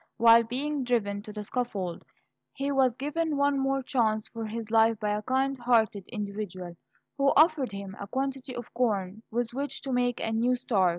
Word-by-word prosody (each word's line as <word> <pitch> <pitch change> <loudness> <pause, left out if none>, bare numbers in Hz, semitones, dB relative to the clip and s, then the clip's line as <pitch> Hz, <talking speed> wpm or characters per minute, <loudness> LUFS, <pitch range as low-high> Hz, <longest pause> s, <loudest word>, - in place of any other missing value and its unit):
While 230 0 +7
being 270 +5 -2
driven 205 -5 0
to 210 - -9
the 210 0 -6
scaffold, 200 -7 -3 0.5
he 275 +1 -2
was 265 -3 +3
given 300 +3 -1
one 280 0 +2
more 270 0 0
chance 220 -5 0
for 225 -1 -5
his 220 0 -6
life 225 -1 +4
by 210 -1 -1
a 210 - -2
kind 265 +3 0
hearted 225 -5 +2
individual 200 -5 -5 0.4
who 275 - +3
offered 305 - +4
him 200 -1 -7
a 200 - -6
quantity 265 +2 -3
of 240 -1 -8
corn 215 -4 -1
with 235 0 -2
which 280 +3 -3
to 270 -2 -3
make 245 -1 +1
a 225 - -2
new 235 +3 +2
start. 210 -7 +2
235 Hz, 185 wpm, -28 LUFS, 210-270 Hz, 0.5 s, While